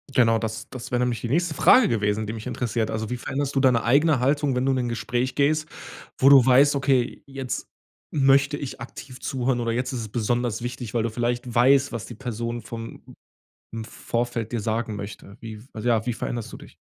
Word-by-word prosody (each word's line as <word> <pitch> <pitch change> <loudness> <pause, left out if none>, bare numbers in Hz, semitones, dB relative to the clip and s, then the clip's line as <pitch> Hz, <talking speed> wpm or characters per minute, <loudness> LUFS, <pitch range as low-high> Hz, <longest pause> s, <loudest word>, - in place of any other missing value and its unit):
Genau, 115 -4 +3
das 110 -1 -5
das 130 0 -8
wäre 125 - +1
nämlich 125 -2 0
die 120 - -4
nächste 165 +4 +1
Frage 250 - +6
gewesen, 105 -1 0
die 110 - -3
mich 110 -1 -7
interessiert. 115 -2 -2
Also, 110 0 -3
wie 125 - -2
veränderst 140 +3 -3
du - - +3
deine 130 -3 +3
eigene 145 +3 +3
Haltung, 140 +1 +1
wenn 125 +1 0
du 135 - +3
in - - 0
'n 125 -1 -1
Gespräch 120 +3 -2
gehst, 155 +2 +2 0.5
wo 135 - +4
du 140 -2 +8
weißt: 135 +3 +5
„Okay, 135 -3 +1
jetzt 135 -2 -5 0.5
möchte 140 0 +4
ich 135 -4 -7
aktiv 125 +2 -10
zuhören 125 -1 -1
oder 115 -1 -1
jetzt 125 +3 -2
ist 125 - -3
es 110 - -6
besonders 120 +1 -1
wichtig,“ 120 -2 -5
weil 115 -2 +1
du 115 - 0
vielleicht 120 +2 -2
weißt, 135 +4 +4
was 115 - -4
die 120 - -9
Person 120 -1 -4
vom 115 +2 -8 0.8
Vorfeld 120 -1 -3
dir 120 - -1
sagen 110 0 -2
möchte. 100 0 -8
Wie 110 -2 -8
also, 110 +2 -3
ja, 115 -2 +2
wie 120 - -1
veränderst 120 0 -4
du - - -7
dich? - - -15
120 Hz, 210 wpm, -24 LUFS, 115-135 Hz, 0.8 s, du